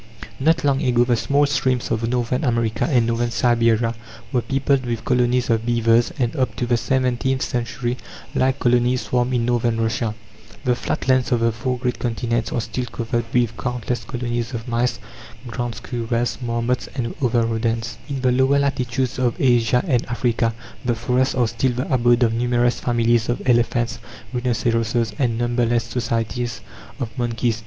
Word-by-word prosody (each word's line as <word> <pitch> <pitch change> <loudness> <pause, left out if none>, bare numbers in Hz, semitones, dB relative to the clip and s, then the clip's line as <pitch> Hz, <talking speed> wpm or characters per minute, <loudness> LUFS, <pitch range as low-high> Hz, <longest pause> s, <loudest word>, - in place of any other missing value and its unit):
Not 160 +4 +2
long 140 -1 +2
ago 120 -1 +3
the 120 -1 +2
small 140 +5 +2
streams 130 -3 0
of 115 +1 0
Northern 125 +3 0
America 115 -4 +1
and 125 -6 +3
Northern 120 +1 0
Siberia 115 -1 +2 0.4
were 125 -3 +2
peopled 135 +1 +1
with 120 -2 -3
colonies 125 0 +2
of 115 -1 +1
beavers, 115 0 +3
and 120 -3 0
up 130 -1 0
to 125 - -1
the 120 0 +2
seventeenth 130 +1 0
century 120 0 -2 0.4
like 130 +1 +2
colonies 125 0 +2
swarmed 125 0 0
in 120 -1 +1
Northern 120 -1 +1
Russia. 110 -1 -1 0.5
The 125 - +3
flat - - -3
lands 130 -1 +3
of 120 -2 +2
the 115 0 +3
four 125 +3 -2
great 125 0 -2
continents 120 -1 -1
are 120 - 0
still 125 +2 -4
covered 120 0 -2
with 120 -2 +1
countless 125 -1 -3
colonies 120 -1 -3
of 115 +1 -6
mice, 120 0 0 0.5
ground 120 -1 -4
squirrels, 115 +1 -2
marmots, 120 +1 -1
and 120 -3 -2
other 120 -2 +2
rodents. 115 +1 -2
In 135 -2 -3
the 130 -1 +3
lower 130 +2 +3
latitudes 130 -2 -1
of 125 -2 0
Asia 120 -2 +3
and 125 -5 +2
Africa 120 -1 0 0.3
the 120 -2 +1
forests 125 +3 +1
are 125 -3 +2
still 120 +3 0
the 130 +4 -2
abode 120 0 +4
of 115 -1 +2
numerous 120 0 +1
families 120 -1 +1
of 120 - -2
elephants, 120 -1 +2 0.3
rhinoceroses, 115 -2 0
and 120 -4 +1
numberless 120 -1 +1
societies 115 0 -2 0.4
of 115 -1 -4
monkeys. 115 -1 0
120 Hz, 165 wpm, -21 LUFS, 115-125 Hz, 0.5 s, abode